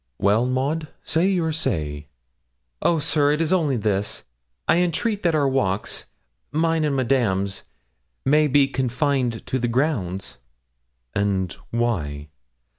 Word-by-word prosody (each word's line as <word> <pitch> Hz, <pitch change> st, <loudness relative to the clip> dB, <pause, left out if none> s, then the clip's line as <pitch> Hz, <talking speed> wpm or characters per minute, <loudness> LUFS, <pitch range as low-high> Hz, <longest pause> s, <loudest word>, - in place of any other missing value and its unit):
'Well, 105 Hz, +5 st, +3 dB
Maud, 140 Hz, +5 st, -1 dB, 0.2 s
say 165 Hz, +4 st, +2 dB
your 175 Hz, -5 st, +1 dB
say.' 75 Hz, -, -2 dB, 0.7 s
'Oh, 170 Hz, -, +3 dB
sir, 150 Hz, -1 st, +2 dB
it 150 Hz, -, -1 dB
is 165 Hz, +2 st, +2 dB
only 155 Hz, -8 st, +2 dB
this: 105 Hz, -2 st, -1 dB, 0.4 s
I -, -, +4 dB
entreat 195 Hz, +5 st, 0 dB
that 170 Hz, -2 st, +2 dB
our 145 Hz, -2 st, +3 dB
walks, 105 Hz, -8 st, -1 dB, 0.5 s
mine 165 Hz, +1 st, +1 dB
and 145 Hz, -2 st, 0 dB
Madame's 115 Hz, -7 st, 0 dB, 0.6 s
may 150 Hz, +3 st, +4 dB
be 140 Hz, 0 st, +4 dB
confined 130 Hz, -2 st, 0 dB
to 130 Hz, -, -1 dB
the 120 Hz, -, 0 dB
grounds.' 115 Hz, -, -1 dB, 0.7 s
'And 95 Hz, -3 st, 0 dB
why?' 80 Hz, -12 st, -1 dB
130 Hz, 125 wpm, -23 LUFS, 100-155 Hz, 0.7 s, I